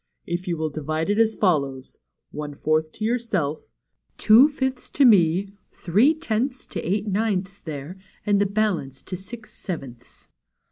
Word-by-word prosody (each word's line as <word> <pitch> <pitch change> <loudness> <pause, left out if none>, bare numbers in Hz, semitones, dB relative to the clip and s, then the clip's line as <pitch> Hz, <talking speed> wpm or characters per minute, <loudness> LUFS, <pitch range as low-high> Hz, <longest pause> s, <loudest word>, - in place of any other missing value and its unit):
If 175 +1 -4
you 170 -2 -1
will 155 -1 -2
divide 155 +4 -2
it 205 - +1
as 225 -1 +3
follows: 140 -9 0 0.3
one 150 -1 -6
fourth 155 +1 0
to 215 - -4
your 240 +3 +1
self, 155 -10 -3 0.4
two 235 +7 +7
fifths 265 -3 -3
to 280 - +3
me, 190 -3 +4 0.2
three 220 - +3
tenths 255 -3 -2
to 175 - -2
Eight 200 +4 -1
Ninths 200 -1 -1
there, 155 +4 -7 0.3
and 205 -1 +3
the 205 - +3
balance 190 -10 -1
to 185 - -5
Six 215 +5 -10
Sevenths." 135 -10 -8
190 Hz, 155 wpm, -24 LUFS, 155-220 Hz, 0.4 s, two